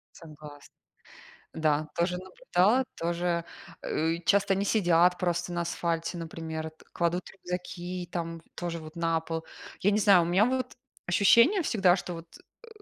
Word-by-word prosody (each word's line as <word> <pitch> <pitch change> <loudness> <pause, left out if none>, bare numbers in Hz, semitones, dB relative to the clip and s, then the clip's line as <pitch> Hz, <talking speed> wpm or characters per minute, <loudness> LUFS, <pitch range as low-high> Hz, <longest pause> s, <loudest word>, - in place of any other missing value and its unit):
Согласна. 150 -3 -13 0.8
Да, 155 -1 +1
тоже 175 +1 0
наблюдала, 185 +5 +1
тоже, 170 0 -1 0.4
э, 165 +2 -1
часто 200 -1 +3
они 195 +1 -1
сидят 180 -4 +3
просто 175 -1 -1
на 170 0 -1
асфальте, 170 0 -2
например, 160 -1 -5 0.2
кладут 175 +1 -1
рюкзаки, 180 -1 -6
там, 165 -1 -4
тоже 170 -1 -4
вот, 155 0 -11
на 165 -1 +1
пол. 160 0 -5 0.4
Я 205 - +3
не 210 - +2
знаю, 195 -4 +6
у - - +1
меня, 180 +4 +4
вот, 255 +2 -1 0.3
ощущение 235 - +5
всегда, 195 - +3
что, 180 -1 -5
вот, 165 0 -9 0.4
э, - - -12
175 Hz, 145 wpm, -28 LUFS, 165-185 Hz, 0.8 s, знаю